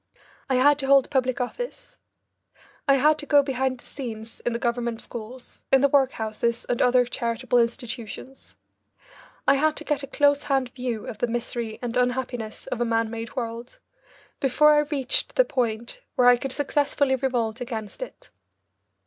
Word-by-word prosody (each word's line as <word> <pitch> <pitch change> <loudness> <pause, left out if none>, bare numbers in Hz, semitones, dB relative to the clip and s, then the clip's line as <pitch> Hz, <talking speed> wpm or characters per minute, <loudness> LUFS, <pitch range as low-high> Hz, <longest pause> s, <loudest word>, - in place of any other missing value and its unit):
I 260 - +2
had 285 +3 +5
to 270 - -2
hold 275 0 +5
public 255 -2 +1
office. 485 - -5 0.9
I 275 - +6
had 300 +3 +3
to 290 - -6
go 285 0 +5
behind 265 -1 -1
the - - -18
scenes 225 -4 -8
in 240 - -2
the 235 - -1
government 235 -2 -1
schools, 240 +3 -9
in 270 - +6
the 280 - +5
workhouses 235 -4 0
and 240 - -1
other 250 0 +4
charitable 240 +1 0
institutions; 235 +2 -4 0.9
I 275 - +7
had 305 +2 +2
to - - -6
get 295 -2 -1
a 275 - -6
close 285 0 +2
hand 270 -3 +1
view 245 -4 -4
of 210 - -7
the 245 - +1
misery 235 -1 -3
and 240 0 -3
unhappiness 250 -3 -2
of 240 - -4
a - - +4
man 225 -1 0
made 230 +2 -6
world, 235 -1 -5 0.6
before 300 +3 +5
I 295 - +5
reached 275 -4 0
the - - +5
point 235 - -2
where 245 - +4
I 245 - +8
could 270 +2 -4
successfully 285 -1 +1
revolt 245 -3 -1
against 220 - -6
it. - - -9
250 Hz, 170 wpm, -25 LUFS, 235-275 Hz, 0.9 s, I